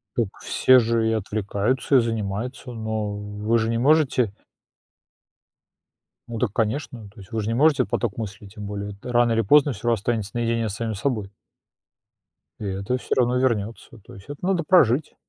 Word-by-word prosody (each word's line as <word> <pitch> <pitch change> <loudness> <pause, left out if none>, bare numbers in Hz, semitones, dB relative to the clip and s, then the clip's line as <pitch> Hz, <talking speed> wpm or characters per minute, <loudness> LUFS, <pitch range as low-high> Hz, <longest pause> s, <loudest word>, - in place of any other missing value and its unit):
Так 115 -4 +1
все 130 0 +5
же 115 -1 +1
и - - +1
отвлекаются, 110 +5 0
и - - +7
занимаются, 115 +3 -3
но 110 -2 -3
вы 105 +2 -1
же 115 0 0
не 115 - 0
можете 130 -5 +3 2.0
ну, 115 -1 -5
так 120 -4 0
конечно, 115 0 -2
то 110 - -17
есть 100 +4 -14
вы 110 - -1
ж 105 - -4
не 115 - 0
можете 140 0 +4
поток 100 +1 -2
мыслей, 105 -2 -6
тем 105 +1 -9
более 100 0 -5
рано 120 -1 +2
или 115 - +2
поздно 145 +6 +4
всё 115 +2 -3
ра 115 - +4
останется 105 -1 -2
наедине 115 -1 0
с 100 - -5
самим 110 0 -3
собой. 105 -2 -2 1.3
И 105 - -5
это 100 +5 -2
всё - - -3
равно 125 0 +2
вернётся, 115 -4 -2
то - - -14
есть 95 +6 -14
это 145 +4 -6
надо 185 -3 +1
прожить. 150 -5 +3
115 Hz, 175 wpm, -23 LUFS, 105-125 Hz, 2.0 s, и